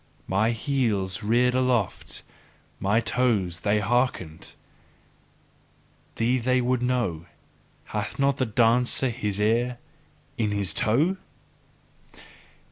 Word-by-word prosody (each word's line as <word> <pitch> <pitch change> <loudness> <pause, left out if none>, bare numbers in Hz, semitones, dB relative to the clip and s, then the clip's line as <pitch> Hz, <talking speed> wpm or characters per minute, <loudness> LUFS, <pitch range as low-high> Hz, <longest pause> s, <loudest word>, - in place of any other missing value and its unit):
My 100 +4 +1
heels 115 - 0
reared 120 +4 +2
aloft, 125 -5 -1 0.6
my 105 +4 +2
toes 110 -8 0
they 105 +3 +1
hearkened, 105 -8 -1 1.6
thee 125 +3 +1
they 125 +2 +2
would 125 0 0
know: 120 -10 -1 0.6
hath - - -4
not 140 -1 +2
the 130 - 0
dancer 120 +3 +2
his 105 -4 -3
ear 120 +4 +1 0.6
in 110 -2 +1
his 100 -2 -2
toe! 155 - +2
115 Hz, 100 wpm, -25 LUFS, 105-125 Hz, 1.6 s, reared